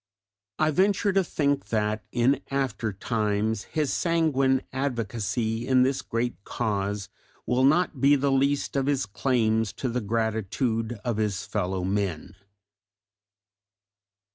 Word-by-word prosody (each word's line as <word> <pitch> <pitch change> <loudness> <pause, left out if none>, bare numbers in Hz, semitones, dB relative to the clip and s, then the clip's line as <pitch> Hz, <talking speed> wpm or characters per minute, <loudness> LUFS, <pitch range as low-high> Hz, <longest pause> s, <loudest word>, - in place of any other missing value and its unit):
I 155 0 +2
venture 200 +4 +2
to 195 0 +3
think 145 -4 0
that 110 -1 -1
in 120 +3 +2
aftertimes 110 -4 -1
his 150 -3 -1
sanguine 140 -6 +2
advocacy 115 -3 -2
in 130 -1 +5
this 135 +1 +1
great 115 -3 -3
cause 100 -4 -2 0.4
will 125 +1 +1
not 150 -1 +3
be 140 +1 +6
the 140 0 +1
least 140 +2 +1
of 135 -1 +1
his 140 -2 +1
claims 110 -1 +1
to 130 - -3
the 125 +1 -1
gratitude 110 +1 -1
of 120 -3 -1
his 105 -2 -1
fellow 95 -3 -2
men. 95 -2 -2
120 Hz, 120 wpm, -26 LUFS, 105-135 Hz, 0.4 s, be